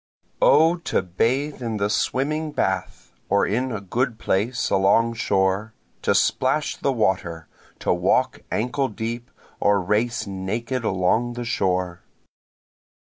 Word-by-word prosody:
O 160 Hz, +4 st, +5 dB
to 170 Hz, -, -1 dB
bathe 130 Hz, -, -1 dB
in 115 Hz, -3 st, -2 dB
the 100 Hz, 0 st, +1 dB
swimming 150 Hz, +8 st, -1 dB
bath, 95 Hz, -7 st, -2 dB, 0.2 s
or 100 Hz, -, +3 dB
in 125 Hz, +5 st, -1 dB
a 105 Hz, -, -3 dB
good 115 Hz, +5 st, -1 dB
place 110 Hz, +6 st, 0 dB
along 100 Hz, +5 st, +3 dB
shore, 100 Hz, -1 st, 0 dB, 0.3 s
To -, -, +2 dB
splash 135 Hz, +4 st, +1 dB
the 140 Hz, -, 0 dB
water! 90 Hz, -, -1 dB, 0.3 s
to -, -, +1 dB
walk -, -, +1 dB
ankle 125 Hz, +5 st, 0 dB
deep, 115 Hz, +2 st, -5 dB, 0.3 s
or 100 Hz, 0 st, +3 dB
race 110 Hz, +6 st, 0 dB
naked 110 Hz, +6 st, -3 dB
along 110 Hz, +5 st, +1 dB
the 120 Hz, 0 st, -5 dB
shore. 90 Hz, -5 st, -1 dB
110 Hz, 130 wpm, -23 LUFS, 95-125 Hz, 0.3 s, O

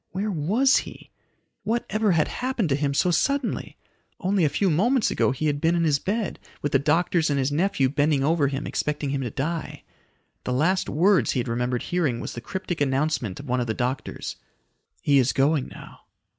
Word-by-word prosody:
Where 205 Hz, +3 st, -2 dB
was 205 Hz, -, +3 dB
he? -, -, -7 dB, 0.5 s
What 230 Hz, +3 st, -1 dB
ever 215 Hz, -3 st, +2 dB
had 155 Hz, -2 st, +2 dB
happened 250 Hz, -8 st, -2 dB
to 135 Hz, -, +2 dB
him 140 Hz, 0 st, 0 dB
so 180 Hz, -, +2 dB
suddenly? 275 Hz, -, -1 dB, 0.4 s
Only 190 Hz, -1 st, +1 dB
a 150 Hz, -, +4 dB
few 185 Hz, +6 st, +1 dB
moments 230 Hz, -, +2 dB
ago -, -, +2 dB
he 135 Hz, +4 st, -2 dB
had 145 Hz, -1 st, 0 dB
been 165 Hz, +1 st, +2 dB
in 170 Hz, -, +1 dB
his 150 Hz, -3 st, +2 dB
bed, 210 Hz, +2 st, -2 dB, 0.2 s
with 145 Hz, -, -1 dB
the 135 Hz, -, +4 dB
doctors 165 Hz, +3 st, +2 dB
and 145 Hz, -, +1 dB
his 135 Hz, +1 st, 0 dB
nephew 160 Hz, -2 st, +1 dB
bending 145 Hz, 0 st, +1 dB
over 155 Hz, -1 st, +2 dB
him, 135 Hz, +1 st, -3 dB
expecting 150 Hz, -2 st, -2 dB
him 140 Hz, -1 st, -1 dB
to 125 Hz, -, -3 dB
die. 155 Hz, +7 st, -4 dB, 0.6 s
The 125 Hz, -, -2 dB
last 180 Hz, +9 st, +1 dB
words 170 Hz, -, +3 dB
he -, -, 0 dB
had 120 Hz, -, -2 dB
remembered 125 Hz, +1 st, -1 dB
hearing 155 Hz, -10 st, 0 dB
was -, -, -5 dB
the 120 Hz, -, -7 dB
cryptic 180 Hz, +1 st, -4 dB
announcement 135 Hz, -7 st, 0 dB
of 140 Hz, -, -9 dB
one 125 Hz, 0 st, 0 dB
of 120 Hz, -, -1 dB
the 110 Hz, -, -2 dB
doctors. 130 Hz, +1 st, -3 dB, 0.7 s
"He 140 Hz, -1 st, +4 dB
is 130 Hz, 0 st, +2 dB
going 140 Hz, 0 st, +2 dB
now." -, -, -12 dB
150 Hz, 200 wpm, -25 LUFS, 135-185 Hz, 0.7 s, a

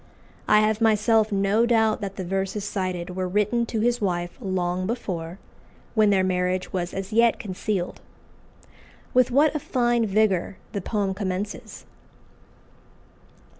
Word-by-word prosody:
I 210 Hz, 0 st, +5 dB
have 215 Hz, +1 st, +1 dB
myself 220 Hz, 0 st, +3 dB
no 200 Hz, +4 st, +2 dB
doubt 220 Hz, -2 st, +2 dB
that 195 Hz, -1 st, -5 dB
the 190 Hz, -, -5 dB
verses 195 Hz, +2 st, -2 dB
cited 185 Hz, -3 st, -3 dB
were 185 Hz, -1 st, -2 dB
written 210 Hz, +5 st, +1 dB
to 225 Hz, -2 st, -2 dB
his 240 Hz, +1 st, +1 dB
wife 175 Hz, -3 st, -2 dB
long 185 Hz, -1 st, -1 dB
before, 180 Hz, -7 st, -4 dB, 0.6 s
when 215 Hz, -2 st, +4 dB
their 195 Hz, -2 st, +3 dB
marriage 185 Hz, 0 st, -1 dB
was 175 Hz, -2 st, -2 dB
as 195 Hz, +2 st, -5 dB
yet 230 Hz, +1 st, +4 dB
concealed. 190 Hz, -2 st, -3 dB, 1.1 s
With 255 Hz, 0 st, +4 dB
what 285 Hz, +4 st, +3 dB
a 305 Hz, -, -1 dB
fine 240 Hz, -4 st, +1 dB
vigour 195 Hz, -3 st, +1 dB
the 200 Hz, -, -3 dB
poem 200 Hz, 0 st, -1 dB
commences! 195 Hz, +1 st, -5 dB
200 Hz, 135 wpm, -24 LUFS, 185-220 Hz, 1.1 s, I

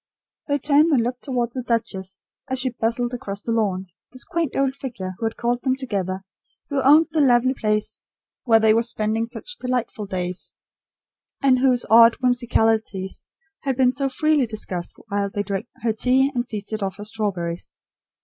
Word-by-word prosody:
They 285 Hz, -1 st, +1 dB
turned 295 Hz, +3 st, +3 dB
and 255 Hz, -6 st, +3 dB
looked 245 Hz, +1 st, -4 dB
towards 245 Hz, -4 st, -1 dB
the 255 Hz, -, -3 dB
duchess 220 Hz, -6 st, -2 dB, 0.3 s
as 260 Hz, -, -1 dB
she 255 Hz, 0 st, +2 dB
bustled 240 Hz, +1 st, -1 dB
across 200 Hz, -4 st, -5 dB
the 230 Hz, -, -2 dB
lawn; 200 Hz, -5 st, 0 dB, 0.3 s
this 255 Hz, 0 st, -6 dB
quaint 330 Hz, -4 st, -2 dB
old 275 Hz, -1 st, +1 dB
figure, 235 Hz, -9 st, -5 dB
who 230 Hz, -, -2 dB
had 225 Hz, -, -6 dB
called 240 Hz, +1 st, 0 dB
them 260 Hz, -1 st, +1 dB
together; 195 Hz, -8 st, -3 dB, 0.5 s
who 280 Hz, -1 st, +1 dB
owned 300 Hz, +5 st, +6 dB
the 315 Hz, -, +2 dB
lovely 255 Hz, -1 st, +4 dB
place 215 Hz, -4 st, -1 dB, 0.4 s
where 225 Hz, -3 st, +5 dB
they 220 Hz, 0 st, +5 dB
were 225 Hz, -, +3 dB
spending 225 Hz, -1 st, -1 dB
such -, -, -8 dB
delightful 245 Hz, -4 st, -2 dB
days; 180 Hz, -1 st, -3 dB, 0.9 s
and 260 Hz, -2 st, +4 dB
whose 250 Hz, -2 st, +3 dB
odd 230 Hz, +1 st, +7 dB
whimsicalities 225 Hz, -6 st, 0 dB, 0.4 s
had 270 Hz, -3 st, -2 dB
been 255 Hz, -2 st, +4 dB
so 275 Hz, +1 st, -1 dB
freely 300 Hz, -1 st, +2 dB
discussed 190 Hz, -5 st, -5 dB, 0.2 s
while 200 Hz, 0 st, 0 dB
they 205 Hz, +1 st, -2 dB
drank 200 Hz, +3 st, -3 dB, 0.2 s
her 225 Hz, -2 st, +2 dB
tea 260 Hz, +5 st, +3 dB
and 240 Hz, -1 st, -1 dB
feasted 215 Hz, 0 st, -4 dB
off 190 Hz, -1 st, -3 dB
her 205 Hz, -, -6 dB
strawberries. 185 Hz, -6 st, -3 dB
235 Hz, 175 wpm, -23 LUFS, 210-260 Hz, 0.9 s, odd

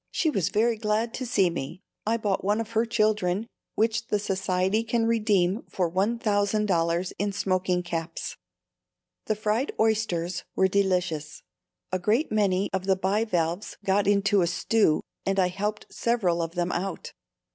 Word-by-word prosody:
She 315 Hz, -, +1 dB
was 195 Hz, -, 0 dB
very 225 Hz, +3 st, +2 dB
glad 220 Hz, +2 st, 0 dB
to 255 Hz, -, -4 dB
see 195 Hz, -6 st, +3 dB
me. 170 Hz, +3 st, -6 dB, 0.2 s
I 230 Hz, +1 st, +2 dB
bought 205 Hz, -4 st, -1 dB
one 205 Hz, +3 st, +1 dB
of 225 Hz, 0 st, -4 dB
her 230 Hz, +1 st, +1 dB
children, 215 Hz, -3 st, +1 dB, 0.3 s
which 225 Hz, +1 st, +1 dB
the 210 Hz, -, +1 dB
Society 195 Hz, +1 st, 0 dB
can 230 Hz, 0 st, 0 dB
redeem 210 Hz, -3 st, +2 dB
for 175 Hz, -3 st, -1 dB
$1,000 200 Hz, -4 st, +1 dB
in 205 Hz, +1 st, 0 dB
smoking 185 Hz, -2 st, 0 dB
caps. 165 Hz, -1 st, -4 dB, 0.9 s
The 215 Hz, -, +1 dB
fried 215 Hz, +5 st, 0 dB
oysters 185 Hz, -6 st, 0 dB
were 190 Hz, -, +4 dB
delicious; 180 Hz, -6 st, -1 dB, 0.5 s
a 185 Hz, -, 0 dB
great 220 Hz, -, +1 dB
many 200 Hz, -2 st, +2 dB
of 190 Hz, -1 st, -1 dB
the 190 Hz, -, +4 dB
bivalves 190 Hz, -2 st, -1 dB
got 195 Hz, +1 st, +2 dB
into 200 Hz, 0 st, +3 dB
a 170 Hz, -, +2 dB
stew, 180 Hz, -1 st, +2 dB, 0.2 s
and 195 Hz, 0 st, 0 dB
I 180 Hz, -1 st, +3 dB
helped 210 Hz, +3 st, -4 dB
several 195 Hz, -8 st, +1 dB
of 165 Hz, +1 st, -4 dB
them 175 Hz, 0 st, 0 dB
out. 190 Hz, 0 st, -4 dB
200 Hz, 155 wpm, -26 LUFS, 180-215 Hz, 0.9 s, were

